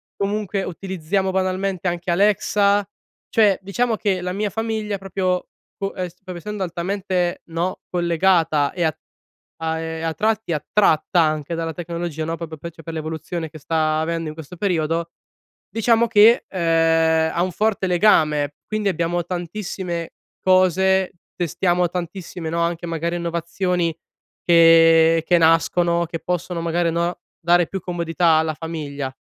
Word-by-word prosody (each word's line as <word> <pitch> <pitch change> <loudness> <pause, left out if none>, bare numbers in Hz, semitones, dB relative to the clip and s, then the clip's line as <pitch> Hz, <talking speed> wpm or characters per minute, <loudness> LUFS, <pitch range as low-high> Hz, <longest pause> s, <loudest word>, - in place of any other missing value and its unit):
comunque 200 -1 -2
utilizziamo 190 +1 -2
banalmente 185 -1 -1
anche 175 0 -2
Alexa. 200 +1 +2 0.4
Cioè, 210 -4 +4
diciamo 225 +4 0
che 190 -4 0
la 180 0 -3
mia 205 +1 -1
famiglia 220 -2 -2
proprio 185 -1 -2 0.3
po 195 -1 -4
es 180 -2 -4
proprio 185 -1 -9
essendo 210 +3 -6
altamente, 180 0 -2
no, 170 +2 -3
collegata 170 -4 +2
e 175 - -1
a 160 -3 +1 0.6
a 160 0 -2
e 160 0 -5
a 165 -1 -1
tratti 215 0 0
attratta 160 +2 +2
anche 155 +1 0
dalla 165 -1 -3
tecnologia, 170 -2 -4
no, 165 +1 -2
proprio 160 -2 -7
per 170 +3 -7 0.2
l'evoluzione 160 +1 -4
che 155 - -11
sta 155 +1 0
avendo 165 0 -2
in 155 - -8
questo 160 +2 -10
periodo, 165 -3 0 0.6
diciamo 230 +1 +2
che, 225 +1 +6
ehm, 165 -2 +2
ha 170 - +1
un 185 0 -1
forte 210 0 0
legame. 155 -6 +3
Quindi, 215 -2 -1
abbiamo 175 0 0
tantissime 175 -1 -4 0.3
cose, 185 0 +3 0.2
testiamo 175 +1 +1
tantissime, 175 -1 -5
no, 170 +1 -1
anche 170 0 -1
magari, 170 +1 -2
innovazioni 170 0 -1 0.5
che 165 -1 +6
che 175 - +4
nascono 170 +1 +3
che 165 0 -6
possono 175 -1 -3
magari, 170 0 +1
no, 170 +1 -1 0.2
dare 175 0 +3
più 195 - -5
comodità 170 -2 +1
alla 160 -1 0
famiglia. 145 -4 -5
175 Hz, 140 wpm, -21 LUFS, 165-190 Hz, 0.6 s, che